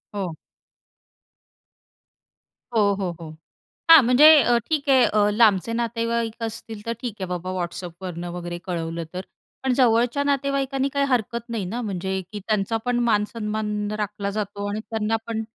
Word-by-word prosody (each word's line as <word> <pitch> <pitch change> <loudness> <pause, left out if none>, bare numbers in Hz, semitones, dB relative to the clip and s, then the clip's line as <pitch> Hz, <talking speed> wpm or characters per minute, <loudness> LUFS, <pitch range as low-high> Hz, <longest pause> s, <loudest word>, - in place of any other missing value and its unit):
हो. 180 -5 -3 2.4
हो, 220 - +4 0.2
हो, 185 -2 -1
हो. 165 -2 -8 0.6
हां, 325 -3 +10
म्हणजे 250 +5 +6 0.2
अ, 240 0 +3
ठीक 300 -3 -1
आहे. 265 -2 +6
अ, 210 -1 +2
लांबचे 215 -1 +3
नातेवाईक 230 0 -2
असतील 225 -1 -6
तर 230 - -1
ठीक 240 -5 -4
आहे 190 - -2
बाबा, 180 0 -4
WhatsAppवरनं 175 0 -6
वगैरे 175 -1 -5
कळवलं 165 -2 -3
तर. 185 - -3 0.4
पण 265 - +1
जवळच्या 240 +1 +3
नातेवाईकांनी, 275 -1 0
काही 280 0 0
हरकत 235 -1 -1
नाही 225 -4 -3
ना 220 +7 -4
म्हणजे, 190 -2 -3
की 210 - -5
त्यांचा 215 +1 0
पण 245 -1 0
मानसन्मान 210 -1 -1
राखला 205 -1 -3
जातो 205 -1 -4
आणि 210 +1 -3
त्यांना 220 0 0
पण 225 -1 -2
215 Hz, 145 wpm, -23 LUFS, 190-240 Hz, 2.4 s, हां